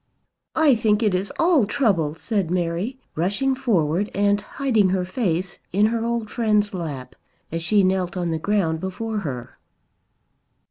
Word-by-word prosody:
"I 315 -4 +5
think 220 -1 +2
it 210 -3 +2
is 185 +2 -1
all 325 - +4
trouble," 185 - +1
said 200 -1 -1
Mary, 180 +7 -1 0.2
rushing 200 - +1
forward 205 - +1
and 205 0 +2
hiding 220 -3 +1
her 185 -1 0
face 185 -3 -2
in 205 +4 +3
her 225 +1 0
old 235 -1 -1
friend's 210 -2 +1
lap 150 -8 -5 0.4
as 165 +1 -2
she 200 +4 +3
knelt 185 -1 0
on 175 -2 -1
the 160 - -1
ground 170 -4 0
before 210 +4 -3
her. 130 -10 -6
200 Hz, 150 wpm, -23 LUFS, 175-225 Hz, 0.4 s, I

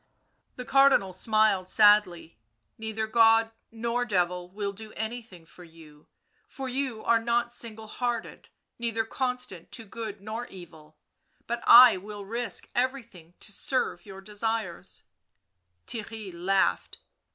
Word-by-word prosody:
The 250 - -7
Cardinal 270 -9 +4
smiled 210 -2 +2
sadly. 205 - +3 0.2
" 115 - -49
Neither 220 0 -3
God 225 0 +4 0.2
nor 235 +2 -1
Devil 180 -5 -1
will 200 +1 -4
do 215 +2 -9
anything 220 -6 -6
for 180 +2 -15
you, 160 -3 -17 0.4
for 270 -1 -7
you 255 -3 -3
are 230 -1 +3
not 235 +1 0
single 225 -2 -5
hearted, 240 +1 -4 0.3
neither 230 -1 -1
constant 250 -7 -3
to 230 - -4
good 215 -1 -7
nor 220 +4 -6
evil; 160 -4 -14 0.5
but 235 0 -3
I— 245 -3 +9
will 205 +1 -9
risk 235 +3 -3
everything 235 -10 -3
to - - -7
serve 205 -4 -1
your 195 -1 -10
desires/' 220 +2 -4 0.8
Theirry 220 -3 -7
laughed. 175 - 0
220 Hz, 130 wpm, -27 LUFS, 190-235 Hz, 0.8 s, I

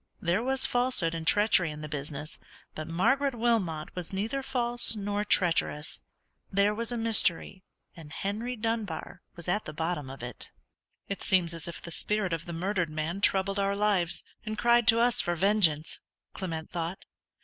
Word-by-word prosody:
There 180 +1 +1
was 265 +2 +2
falsehood 245 -9 +1
and 165 -1 -5
treachery 205 -5 +4
in 150 0 -7
the 155 - -5
business, 150 0 -3 0.3
but 155 - -6
Margaret 265 +11 +1
Wilmot 215 -10 0
was 180 -2 -5
neither 220 +8 -2
false 240 -3 +1
nor 205 0 -2
treacherous. 170 -6 +1 0.5
There 200 +1 +3
was 230 +2 +1
a 240 - -2
mystery, 215 -5 +4 0.3
and 155 -3 -12
Henry 220 +8 -3
Dunbar 220 -7 -4
was 175 0 -5
at 205 +4 0
the 155 - -6
bottom 160 -4 -2
of 135 -2 -9
it. 125 -1 -5 0.6
"It 200 - -4
seems 175 -3 +2
as 165 0 -3
if 170 - -7
the 170 - -7
spirit 210 0 0
of 165 0 -4
the - - -5
murdered 175 0 -1
man 155 +5 -3
troubled 195 0 +2
our 200 0 +1
lives, 200 -4 +2 0.2
and 215 -1 -5
cried 240 0 +3
to 230 - +6
us 240 0 +4
for 175 - -1
vengeance," 170 -5 +2 0.3
Clement 165 -4 -5
thought. 170 +1 -4
190 Hz, 170 wpm, -29 LUFS, 165-220 Hz, 0.6 s, to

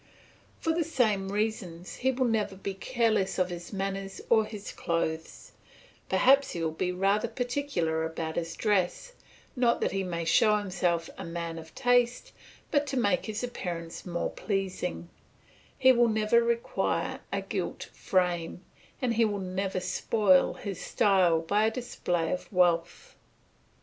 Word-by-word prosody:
For 325 - 0
the 335 +1 +1
same 215 -11 +1
reasons 200 -5 -3
he 260 - +1
will 260 0 0
never 220 -4 0
be 195 +1 -4
careless 220 -2 0
of 180 -1 +1
his 175 0 -7
manners 195 -1 -4
or 220 -2 +5
his 210 -2 -7
clothes; 160 -1 -3 0.6
perhaps 275 +2 +4
he 170 - -3
will 160 - 0
be 180 +3 -1
rather 195 +5 +1
particular 245 - -1
about 160 0 -4
his 165 -1 -3
dress, 210 - 0 0.4
not 245 -2 +2
that - - +1
he 195 0 -1
may 170 -2 -3
show 210 +5 +4
himself 180 -4 -1
a - - -4
man 165 -1 -5
of 160 0 -13
taste, 245 -1 +2 0.4
but 290 -1 +2
to 270 -1 -2
make 205 -6 +1
his 220 +2 -3
appearance 175 -8 -5
more 175 -1 -2
pleasing; 190 -4 -3 0.7
he 260 -1 +6
will 240 -2 +4
never 220 +2 +3
require 235 0 -1
a - - -1
gilt - - -4
frame, 180 -1 -1 0.4
and 245 -2 +2
he 230 0 +3
will 210 -2 +1
never 190 0 -2
spoil 185 +1 +3
his 200 -3 -6
style 185 -5 +3
by 205 +6 +2
a - - +3
display 180 -8 -2
of 180 - -5
wealth. 175 - +1
195 Hz, 150 wpm, -29 LUFS, 175-235 Hz, 0.7 s, he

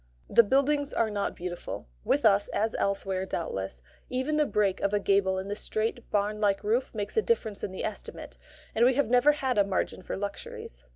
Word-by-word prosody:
The - - +7
buildings 280 +5 +1
are 220 -2 +1
not 205 -1 -2
beautiful. 175 0 -6 0.2
With 290 -3 +1
us, 205 -1 +5
as 220 +1 -1
elsewhere, 195 -1 0
doubtless, 95 - -4 0.3
even 260 +4 0
the 300 -1 +3
break 200 -3 +1
of 200 - 0
a - - +3
gable 195 -1 +2
in 190 +1 -4
the 205 - -3
straight, 220 +3 -3
barn 210 +1 0
like 200 -2 +2
roof 230 +5 +1
makes 205 - -4
a - - +6
difference 230 - -1
in - - -2
the 190 - -4
estimate, - - -7 0.4
and 230 - +3
we 250 +1 +5
have 275 -4 +1
never 255 +4 +6
had 260 -6 0
a - - +6
margin 195 -1 -2
for - - -5
luxuries. 195 - -6
210 Hz, 205 wpm, -28 LUFS, 195-250 Hz, 0.4 s, The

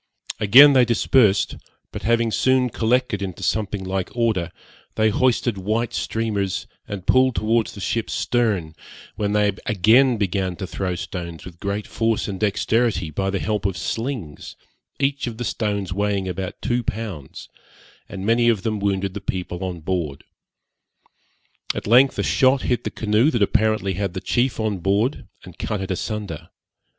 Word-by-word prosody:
Again 130 +7 +8
they 130 -2 +6
dispersed, 115 -3 +3 0.3
but - - -6
having 115 0 +1
soon 130 +1 +2
collected 115 -2 0
into 95 0 -5
something 105 0 -1
like 95 0 -2
order, 110 -8 0 0.4
they 110 0 +3
hoisted 120 -2 +1
white 110 +4 -1
streamers, 105 -4 -2 0.2
and 100 -3 -6
pulled 130 -1 +4
towards 115 +1 +1
the 100 - -9
ship's 115 +3 -2
stern, 105 -10 0 0.4
when 105 0 -1
they 105 -1 +3 0.2
again 115 +6 +4
began 95 -2 -1
to 95 - -5
throw 95 -1 -3
stones 85 -1 -6
with 85 -2 -11
great 100 +1 -3
force 115 -1 -1
and 95 -2 -5
dexterity, 105 -4 +1
by 95 +5 -1
the 100 - -1
help 105 0 -2
of 95 -2 -4
slings, 115 - -4 0.4
each 140 -1 0
of 115 -2 -5
the 120 - -4
stones 100 -5 -2
weighing 100 -1 -1
about 95 0 -5
two 120 0 +1
pounds, 100 - -6 0.6
and 95 -1 -6
many 120 +2 +3
of 105 -4 +1
them 110 -2 -1
wounded 100 -1 -1
the 100 - -6
people 90 -1 -4
on 90 -3 -4
board. 80 -5 -3 1.5
At - - -4
length 125 +5 +5
a - - 0
shot 130 -1 +3
hit 125 - -1
the - - 0
canoe 110 +5 +2
that 120 -9 +1
apparently 110 -2 +1
had 95 -1 -3
the - - -2
chief 120 +5 0
on 110 -3 -1
board, 100 - 0 0.2
and - - -13
cut 105 - -2
it 95 0 -4
asunder. 100 -3 -4
105 Hz, 160 wpm, -22 LUFS, 95-115 Hz, 1.5 s, Again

